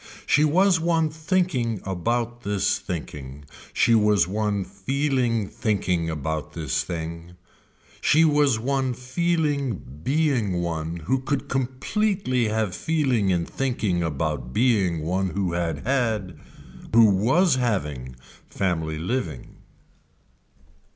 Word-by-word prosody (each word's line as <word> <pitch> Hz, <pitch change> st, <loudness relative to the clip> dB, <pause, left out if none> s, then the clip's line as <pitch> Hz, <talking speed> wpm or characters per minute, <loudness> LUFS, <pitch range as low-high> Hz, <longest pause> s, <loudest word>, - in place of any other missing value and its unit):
She 145 Hz, -, +4 dB
was 175 Hz, +3 st, +4 dB
one 165 Hz, -2 st, +1 dB
thinking 155 Hz, -, 0 dB
about 115 Hz, +6 st, -2 dB
this 100 Hz, -4 st, 0 dB
thinking, 75 Hz, -4 st, -7 dB, 0.3 s
she 115 Hz, -, +3 dB
was 105 Hz, -5 st, +4 dB
one 105 Hz, 0 st, -1 dB
feeling 125 Hz, -1 st, 0 dB
thinking 90 Hz, -7 st, -1 dB
about 80 Hz, -1 st, -3 dB
this 80 Hz, -5 st, -1 dB
thing, 85 Hz, 0 st, -6 dB, 0.7 s
she 160 Hz, +2 st, +5 dB
was 145 Hz, -5 st, +3 dB
one 130 Hz, +1 st, -1 dB
feeling 145 Hz, -, 0 dB, 0.3 s
being 135 Hz, -, +1 dB
one 85 Hz, -2 st, -2 dB
who 130 Hz, +3 st, +1 dB
could 135 Hz, +1 st, -2 dB
completely 130 Hz, -, 0 dB
have 110 Hz, -3 st, -1 dB
feeling 130 Hz, -, +1 dB
in 85 Hz, -2 st, +1 dB
thinking 110 Hz, -9 st, -1 dB
about 75 Hz, -5 st, -2 dB
being 100 Hz, -10 st, +2 dB
one 95 Hz, +4 st, 0 dB
who 90 Hz, -1 st, -2 dB
had 85 Hz, -1 st, -2 dB
had, 110 Hz, -8 st, 0 dB, 0.6 s
who 115 Hz, -1 st, +8 dB
was 130 Hz, -, +3 dB
having 75 Hz, -, -2 dB, 0.3 s
family 80 Hz, -5 st, -1 dB
living. 85 Hz, -, -4 dB
110 Hz, 110 wpm, -24 LUFS, 85-135 Hz, 0.7 s, who